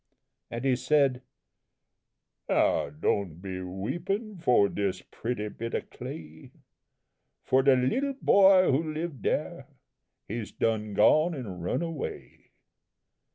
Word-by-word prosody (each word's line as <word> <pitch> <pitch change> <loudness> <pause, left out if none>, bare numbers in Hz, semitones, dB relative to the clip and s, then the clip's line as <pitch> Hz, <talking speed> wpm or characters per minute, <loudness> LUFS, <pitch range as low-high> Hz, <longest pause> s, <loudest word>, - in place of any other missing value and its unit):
And 120 +3 -5
he 130 -2 +3
said: 130 0 +2 1.3
"Now, - - +2
don' 80 +4 -1
be 95 +1 -6
weepin' 175 - -4
for 125 -10 +4
dis 100 -2 -2
pretty 115 -2 -4
bit 115 +2 -5
o' - - 0
clay 80 0 -10 0.9
For 130 - +3
de 135 0 +5
little 265 - 0
boy 190 - +6
who 155 +3 0
lived 155 -6 -4
dere, - - -2 0.6
he's 110 +1 -5
done 110 -2 -1
gone 155 - +4
an' 105 -10 -6
run 90 - -1
away! 165 -4 -7
125 Hz, 115 wpm, -28 LUFS, 100-160 Hz, 1.3 s, boy